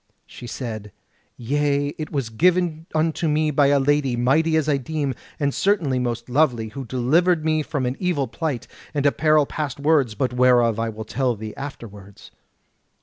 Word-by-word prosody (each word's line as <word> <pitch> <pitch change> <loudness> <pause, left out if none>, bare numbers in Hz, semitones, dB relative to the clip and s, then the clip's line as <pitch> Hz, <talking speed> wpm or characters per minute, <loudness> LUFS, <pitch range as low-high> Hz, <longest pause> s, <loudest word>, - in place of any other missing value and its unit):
She 120 - -11
said: 110 -4 -6 0.5
"Yea; 145 +3 0
it 155 +1 -7
was 135 -6 -2
given 170 +3 +1
unto 160 +1 +1
me 155 0 +1
by 145 -1 +3
a 140 0 +4
lady, 135 -2 +1
mighty 155 +7 +2
as 155 -1 0
I 145 -2 +2
deem, 140 0 -2 0.3
and 140 -2 0
certainly 165 -11 +1
most 120 -2 -3
lovely, 125 -4 +1
who 135 +4 -7
delivered 155 +8 +2
me 155 -1 +2
from 145 -3 -3
an 125 +1 -1
evil 170 -7 0
plight, 145 0 -3 0.3
and 145 -1 0
a 145 - +5
peril 155 -1 +3
past 145 -2 -4
words, 140 -6 +2
but 130 -1 -1
whereof 120 -3 +3
I 115 0 -1
will 110 0 -7
tell 125 +1 -1
thee 110 0 -7
afterwards. 105 -8 -10
140 Hz, 175 wpm, -22 LUFS, 120-155 Hz, 0.5 s, a